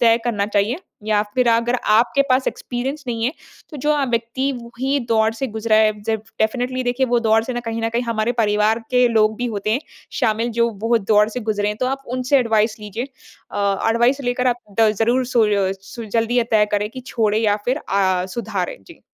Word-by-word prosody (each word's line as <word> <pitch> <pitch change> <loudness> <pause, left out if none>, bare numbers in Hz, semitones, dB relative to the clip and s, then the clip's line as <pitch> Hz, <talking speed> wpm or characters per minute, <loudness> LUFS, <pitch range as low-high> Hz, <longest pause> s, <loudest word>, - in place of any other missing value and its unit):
तय 230 -1 +5
करना 210 -4 0
चाहिए 210 +6 0 0.3
या 210 -1 +2
फिर 250 -2 +3
अगर 235 +2 +2 0.2
आपके 235 +6 +4
पास 255 +1 +3
एक्सपीरियंस 265 +4 -5
नहीं 230 -2 -2
है। 260 - +1 0.4
तो 300 - -8
जो 295 +2 0
अ, 290 -2 +1
व्यक्ति 240 +2 -1
वही 260 +4 -2
दौर 220 -1 +3
से 265 +3 -2
गुज़रा 220 -1 +1
है। 215 0 +4
जब 220 0 -1 0.2
डेफ़िनेटली 250 +3 0
देखिए 245 +2 +1
वो 240 -1 +2
दौर 225 -1 +3
से 255 - -4
ना 240 - -3
कहीं 230 -1 -4
न 225 - +1
कहीं 235 +1 -1
हमारे 230 0 -1
परिवार 210 +1 +2
के 250 0 +4
लोग 215 -1 +2
भी 245 - -2
होते 205 +2 -2
हैं 255 - +1 0.4
शामिल 230 0 +1
जो 235 - +4
वो 230 0 +3
दौर 210 0 +3
से 250 +3 -5
गुज़रे 205 -1 +1
हैं 210 - -3
तो 255 - +1
आप 270 +1 -2
उनसे 255 +2 +2
एडवाइज़ 220 -3 +1
लीजिए। 210 +3 -5 0.5
अ, 200 +1 0
एडवाइज़ 240 +5 +2
लेकर 245 +1 0
आप 245 - +2 0.2
द 220 -1 +6
ज़रूर 245 +3 +2
सोय 210 -6 +2
सुल 210 +4 -9
जल्दी 230 +2 +1
अ, - - +5
ये 230 - 0
तय 215 -1 +4
करें 205 0 +1
कि 255 - -8
छोड़ें 215 -2 +1
या 210 -2 +2
फिर 255 +2 +1
अ, 190 -7 0
सुधारें। 195 -2 -4
जी। - - -15
230 Hz, 215 wpm, -20 LUFS, 215-245 Hz, 0.5 s, द